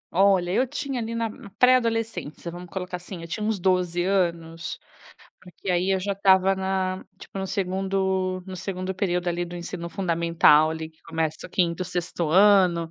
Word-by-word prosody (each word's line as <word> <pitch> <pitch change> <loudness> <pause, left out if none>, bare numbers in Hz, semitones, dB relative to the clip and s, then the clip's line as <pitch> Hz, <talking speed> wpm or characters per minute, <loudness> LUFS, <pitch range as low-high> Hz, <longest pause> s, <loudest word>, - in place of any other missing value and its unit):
Olha, 190 -2 +4
eu 255 +6 +2
tinha, 275 -2 -3
ali, 230 +1 -4
na 230 -1 0
na 205 -2 -11
pré-adolescência, 225 -9 +1
vamos 175 0 -9
colocar 180 -1 -4
assim, 175 -1 -8
eu - - -7
tinha 210 +6 -4
uns 215 -2 0
12 180 -1 +1
anos, 170 -3 -1 0.6
porque 180 +1 -7
aí 180 +2 +1
eu 190 - -1
já 200 +1 -1
estava 190 -1 +4
na 190 0 -2
tipo 195 - -9
no 190 - -2
2º 190 -1 -1
no 185 -1 -7
2º 185 +1 -4
período, 180 -2 -1
ali, 175 0 -1
do 175 0 -9
ensino 170 0 -6
fundamental, 170 -4 +4
ali, 160 0 -5
que 160 - -28
começa 160 -1 -3
o - - -19
5º, 175 0 0
6º 175 -2 -2
ano, 185 -3 +5
185 Hz, 175 wpm, -25 LUFS, 170-195 Hz, 0.6 s, ano